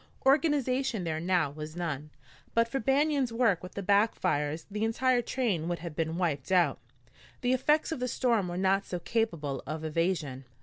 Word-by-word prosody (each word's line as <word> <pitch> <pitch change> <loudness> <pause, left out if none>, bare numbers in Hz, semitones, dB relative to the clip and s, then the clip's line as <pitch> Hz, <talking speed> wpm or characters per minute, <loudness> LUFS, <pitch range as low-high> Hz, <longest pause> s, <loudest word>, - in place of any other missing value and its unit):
Organization 270 - +2
there 160 -2 -2
now 175 -4 +1
was 155 +2 -8
none. 155 -4 -3 0.5
But 230 0 +4
for 270 +3 -2
Banion's 275 0 +2
work 230 -7 +2
with 185 - -9
the 200 - -4
back 205 +3 +3
fires 150 -2 -1
the 210 +1 -2
entire 245 +2 +2
train 225 -10 -1
would 175 0 -1
have 170 -2 -7
been 160 +1 -1
wiped 160 -5 -1
out. 175 -7 +3 0.6
The 245 +1 +2
effects 300 +5 +2
of 320 - -2
the 250 - -1
storm 235 -5 +1
were 175 0 -4
not 195 +1 +2
so 180 - -4
capable 170 -8 -1
of 155 +2 -4
evasion. 155 -5 -1
190 Hz, 180 wpm, -29 LUFS, 160-245 Hz, 0.6 s, But